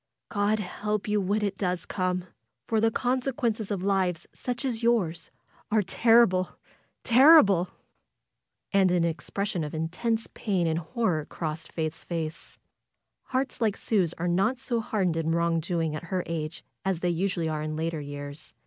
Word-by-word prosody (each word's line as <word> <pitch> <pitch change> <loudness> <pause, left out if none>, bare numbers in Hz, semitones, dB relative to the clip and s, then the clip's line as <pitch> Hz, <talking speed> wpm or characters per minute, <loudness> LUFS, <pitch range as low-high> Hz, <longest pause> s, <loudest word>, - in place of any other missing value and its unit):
God 205 +1 +1
help 210 +1 -3
you 210 0 +2
when 205 +3 0
it 200 -2 -2
does 180 -2 -1
come! 180 -1 -1 0.4
For 220 +7 +1
the 225 - +4
consequences 245 -3 -1
of 195 -3 -2
lives 190 -4 +1
such 245 0 -4
as 240 -4 -1
yours 180 -9 +1 0.4
are 215 -1 +3
terrible 225 -4 +4 0.2
— - - -42
terrible!^^ 235 - +7 1.0
And 195 -2 +4
an 175 -1 +3
expression 180 +2 -2
of 150 +1 -5
intense 220 +9 -1
pain 190 -5 0
and 160 0 +1
horror 175 - -1
crossed 160 0 -5
Faith's 160 -1 -3
face. 165 -1 -5 0.7
Hearts 260 -1 -2
like 215 -3 +1
Sue's 185 -7 +1
are 175 - -2
not 195 +8 +2
so 240 -2 -1
hardened 190 -6 0
in 165 0 0
wrong 170 0 +2
doing 165 -2 -1
at 155 - -6
her 180 +1 -1
age 165 0 -4 0.2
as 190 -3 -1
they 180 - +1
usually 175 -1 0
are 155 -1 -2
in 155 0 -3
later 160 0 -2
years. 145 +1 -7
185 Hz, 160 wpm, -27 LUFS, 165-215 Hz, 1.0 s, terrible!^^